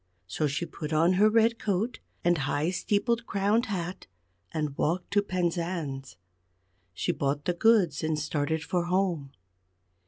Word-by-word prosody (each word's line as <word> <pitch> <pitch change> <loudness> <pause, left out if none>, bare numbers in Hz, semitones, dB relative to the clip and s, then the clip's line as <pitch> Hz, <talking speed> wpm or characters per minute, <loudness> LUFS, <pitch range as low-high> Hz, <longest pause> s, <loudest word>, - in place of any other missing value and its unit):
So 150 +11 -1
she 145 +5 -2
put 155 -2 -7
on 165 +4 +4
her 205 +4 +5
red 230 +1 +3
coat 210 +4 -1 0.2
and 175 0 +4
high 145 +4 0
steeple 205 +5 +1
crowned 220 +1 0
hat, 180 -3 -4 0.4
and 150 -3 -2
walked 175 +6 -1
to 205 0 +4
Penzance. 170 - -2 0.8
She - - -1
bought 140 +1 -1
the 180 - +1
goods 185 -6 +3
and 155 -1 0
started 150 +1 -1
for 175 +1 -1
home. 175 -6 0
175 Hz, 145 wpm, -28 LUFS, 150-200 Hz, 0.8 s, her